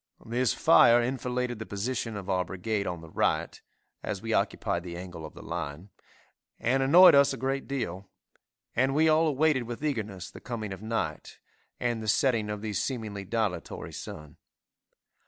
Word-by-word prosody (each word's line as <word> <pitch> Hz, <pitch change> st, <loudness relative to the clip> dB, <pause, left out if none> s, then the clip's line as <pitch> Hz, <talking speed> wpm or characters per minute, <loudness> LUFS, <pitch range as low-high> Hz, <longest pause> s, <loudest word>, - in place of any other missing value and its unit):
This 120 Hz, 0 st, +1 dB
fire 120 Hz, +1 st, +6 dB
enfiladed 125 Hz, -1 st, -2 dB
the 110 Hz, -, -5 dB
position 115 Hz, +1 st, -3 dB
of 95 Hz, -2 st, -7 dB
our 95 Hz, -1 st, +1 dB
brigade 100 Hz, +3 st, -3 dB
on 85 Hz, -2 st, -4 dB
the 80 Hz, -, -11 dB
right, -, -, 0 dB, 0.4 s
(as -, -, -4 dB
we -, -, -3 dB
occupied 85 Hz, -, 0 dB
the 85 Hz, -1 st, -7 dB
angle 90 Hz, -2 st, -8 dB
of -, -, -17 dB
the -, -, -10 dB
line,) 85 Hz, +2 st, -5 dB, 0.7 s
and 130 Hz, +3 st, +1 dB
annoyed 170 Hz, +6 st, +8 dB
us 140 Hz, -1 st, +5 dB
a -, -, -5 dB
great 135 Hz, +2 st, -2 dB
deal, 100 Hz, -9 st, -4 dB, 0.7 s
and 135 Hz, +3 st, +2 dB
we 160 Hz, +2 st, +4 dB
all 160 Hz, +1 st, +4 dB
awaited 150 Hz, -3 st, +2 dB
with 120 Hz, +5 st, -5 dB
eagerness 100 Hz, -9 st, -3 dB
the -, -, -11 dB
coming 110 Hz, -5 st, -5 dB
of 95 Hz, -, -9 dB
night, 115 Hz, +1 st, -3 dB, 0.4 s
and 120 Hz, -2 st, -1 dB
the 110 Hz, -, -6 dB
setting 110 Hz, -1 st, +2 dB
of 105 Hz, 0 st, -4 dB
the 110 Hz, -1 st, -3 dB
seemingly 105 Hz, -3 st, -3 dB
dilatory 105 Hz, -5 st, -3 dB
sun. 75 Hz, -1 st, -9 dB
115 Hz, 170 wpm, -28 LUFS, 95-130 Hz, 0.7 s, annoyed